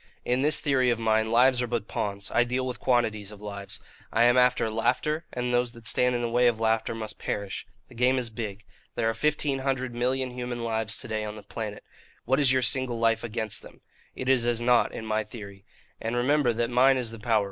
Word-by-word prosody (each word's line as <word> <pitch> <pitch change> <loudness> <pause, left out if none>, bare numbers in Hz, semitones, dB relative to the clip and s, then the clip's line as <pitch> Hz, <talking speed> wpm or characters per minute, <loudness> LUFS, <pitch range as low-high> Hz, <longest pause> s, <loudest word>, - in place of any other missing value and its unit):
In 125 +1 +1
this 150 +2 +3
theory 130 -4 +2
of 120 - +2
mine, 110 -1 +1
lives 125 +2 +4
are 125 - -1
but 115 -3 -2
pawns; 100 -1 -3
I 120 - +4
deal 125 +2 -2
with 125 -1 -4
quantities 110 -5 0
of 105 -1 -11
lives. 100 -1 -7 0.3
I 115 - +3
am 120 +1 +5
after 125 -2 +3
laughter, 130 +8 0
and 125 0 -2
those 120 -1 +1
that 115 -2 -14
stand 125 +1 +3
in 120 - -1
the 120 - -1
way 120 +1 +4
of 115 -2 +1
laughter 115 0 0
must 110 -1 -6
perish. 100 -1 -4 0.2
The - - -16
game 125 +2 +2
is 120 -3 -2
big. 105 -2 -6 0.3
There 115 - 0
are 115 - +1
fifteen 145 +2 0
hundred 130 -2 -2
million 130 +2 -1
human 125 -1 -5
lives 110 -1 -1
to - - -5
day 110 -1 -2
on 105 0 -5
the 105 - -10
planet. 105 -3 -6 0.4
What 130 +3 +2
is 140 -3 +4
your 130 -1 +2
single 125 0 +1
life 115 0 +2
against 110 -2 -2
them? - - -15 0.3
It 130 - -5
is 130 -2 +3
as 120 -1 +1
naught, 120 0 +3
in 110 - -7
my 110 0 0
theory. 100 -3 -11 0.4
And 115 +1 -2
remember 130 +1 +2
that 115 +1 -1
mine 130 +2 +5
is 120 -3 -2
the 115 - -9
power. 110 0 +2
120 Hz, 230 wpm, -27 LUFS, 110-125 Hz, 0.4 s, am